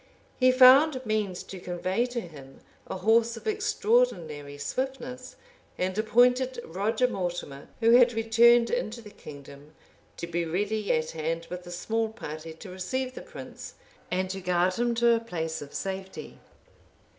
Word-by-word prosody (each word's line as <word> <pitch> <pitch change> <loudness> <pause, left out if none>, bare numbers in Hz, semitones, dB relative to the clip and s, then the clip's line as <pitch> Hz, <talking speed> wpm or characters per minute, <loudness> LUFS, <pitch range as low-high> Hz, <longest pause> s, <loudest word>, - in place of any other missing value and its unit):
He 255 -1 +6
found 260 +3 +7
means 210 -4 -1
to 190 - -9
convey 185 +6 -1
to 245 -1 -4
him 140 -7 -13 0.3
a - - -4
horse 225 +4 +2
of - - -12
extraordinary 415 - 0
swiftness; 255 - -5 0.4
and 185 +1 -1
appointed 250 +4 +3
Roger 215 +8 0
Mortimer 175 - -5
who 230 0 +5
had 245 0 +6
returned 230 +1 +4
into 245 - -2
the 210 -3 -12
kingdom, 145 -2 -13 0.4
to - - -4
be 170 0 -2
ready 205 +5 -1
at 155 0 0
hand 165 +1 -3
with 180 0 -7
a - - -8
small 225 +5 -1
party 160 -7 -8
to 180 +4 -11
receive 255 +8 -3
the - - -8
prince, - - -10 0.3
and 185 +1 -1
to 195 0 -5
guard 180 0 +1
him 240 +3 0
to 235 0 +4
a 230 - +2
place 165 -8 -4
of 145 -1 -9
safety. 190 0 -6
210 Hz, 155 wpm, -27 LUFS, 175-240 Hz, 0.4 s, found